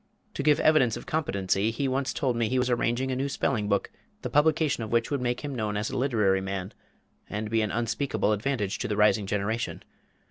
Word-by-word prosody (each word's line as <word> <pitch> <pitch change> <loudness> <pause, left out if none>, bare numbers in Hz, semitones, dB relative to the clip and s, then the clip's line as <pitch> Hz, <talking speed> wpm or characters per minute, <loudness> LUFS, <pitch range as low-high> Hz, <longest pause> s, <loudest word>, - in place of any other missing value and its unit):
To - - -3
give 150 +1 +4
evidence 135 -8 +4
of - - -9
competency, 100 -9 0
he 125 +5 -1
once 135 +1 0
told 130 -3 -1
me 115 -2 0
he 130 - 0
was 125 0 +1
arranging 120 +2 0
a - - -1
new 135 +2 -1
spelling 110 -6 -1
book, 100 -1 0 0.3
the - - -4
publication 150 -3 +2
of 110 - -6
which 115 +2 +1
would 140 -3 0
make 125 0 -1
him 145 -2 -4
known 105 -4 -2
as 105 +1 -2
a - - -4
literary 105 -8 +2
man, 95 0 -4 0.6
and 105 +1 -4
be 115 -1 +2
an 105 - 0
unspeakable 115 +1 0
advantage 105 -2 -1
to - - -2
"the 105 - -2
rising 105 -1 +3
generation." 105 +3 -2
115 Hz, 215 wpm, -27 LUFS, 105-135 Hz, 0.6 s, give